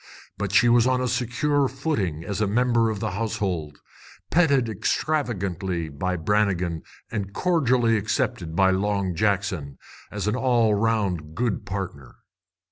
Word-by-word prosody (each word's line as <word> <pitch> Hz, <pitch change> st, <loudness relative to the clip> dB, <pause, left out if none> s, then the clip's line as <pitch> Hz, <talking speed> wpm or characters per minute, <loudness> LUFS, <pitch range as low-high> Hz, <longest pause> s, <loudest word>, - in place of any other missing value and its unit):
But 100 Hz, -2 st, -3 dB
she 120 Hz, +4 st, +5 dB
was 120 Hz, 0 st, +5 dB
on 130 Hz, 0 st, +2 dB
a 125 Hz, -, 0 dB
secure 125 Hz, +4 st, +1 dB
footing 115 Hz, -, -2 dB
as 100 Hz, +3 st, -3 dB
member 115 Hz, +2 st, +2 dB
of 110 Hz, -2 st, -3 dB
the 110 Hz, 0 st, -2 dB
household, 95 Hz, -7 st, -3 dB, 0.5 s
petted 140 Hz, -8 st, +3 dB
extravagantly 95 Hz, -, -1 dB
by 90 Hz, +6 st, -2 dB
Brannigan 90 Hz, -2 st, 0 dB, 0.3 s
and 100 Hz, -1 st, -4 dB
cordially 130 Hz, -10 st, +2 dB
accepted 105 Hz, -, -2 dB
by 95 Hz, 0 st, +4 dB
Long 100 Hz, -1 st, 0 dB
Jackson 95 Hz, -8 st, -1 dB, 0.3 s
as 105 Hz, -2 st, -3 dB
an 105 Hz, -, +1 dB
all 120 Hz, -4 st, +2 dB
round 100 Hz, -8 st, 0 dB
good 115 Hz, -4 st, -1 dB
partner. 90 Hz, -9 st, -6 dB
105 Hz, 130 wpm, -24 LUFS, 95-120 Hz, 0.5 s, she